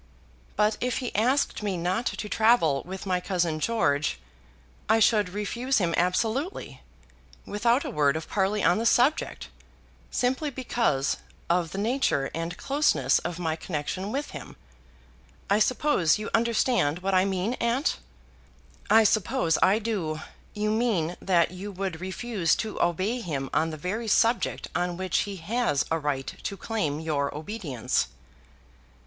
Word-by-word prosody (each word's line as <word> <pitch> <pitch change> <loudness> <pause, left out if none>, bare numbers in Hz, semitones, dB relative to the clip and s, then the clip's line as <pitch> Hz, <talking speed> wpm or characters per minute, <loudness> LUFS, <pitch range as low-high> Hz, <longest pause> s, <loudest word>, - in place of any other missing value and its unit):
But 210 +1 +2
if 250 -1 0
he 250 - -4
asked 250 +6 +1
me 200 -3 -1
not 185 +8 -1
to 210 - -3
travel 215 - +3
with 190 +1 -6
my 185 -2 +1
cousin 175 -4 -1
George, 155 -8 +1 0.7
I 220 - +5
should 210 -3 +4
refuse 235 +7 -1
him 175 -4 +1
absolutely, 225 - -1 0.6
without 235 +6 +1
a - - -3
word 145 -1 +2
of 160 - -4
parley 200 +1 0
on 175 - +4
the 230 - -1
subject, 260 +7 +2 0.6
simply 260 +5 0
because 235 - 0 0.3
of 175 -1 +1
the 195 - -7
nature 215 - 0
and 165 +2 -4
closeness 285 +2 +2
of 175 - -5
my 165 -3 -1
connection 180 +5 -4
with 285 +4 -3
him. - - -9 1.0
I 205 - +4
suppose 220 - +2
you 215 +1 -5
understand 225 - +1
what 195 0 0
I 185 0 +5
mean, 195 +3 -1
aunt?" 240 +6 +1 0.9
"I 225 0 +7
suppose 175 -6 +2
I 195 +3 +5
do. 195 -9 -2 0.4
You 210 0 0
mean 210 -8 0
that 175 -3 +2
you 190 +3 -7
would 185 -3 -4
refuse 190 -1 0
to 220 -1 -4
obey 185 +8 0
him 140 - -4
on 160 +1 +2
the 155 - -6
very 205 +9 -3
subject 230 +3 +2
on 175 0 -1
which 185 -2 0
he 200 - -5
has 190 - 0
a 165 - +1
right 145 -3 -2
to 200 - -4
claim 190 -12 -2
your 150 -3 -1
obedience." 155 - -2
195 Hz, 150 wpm, -27 LUFS, 165-230 Hz, 1.0 s, I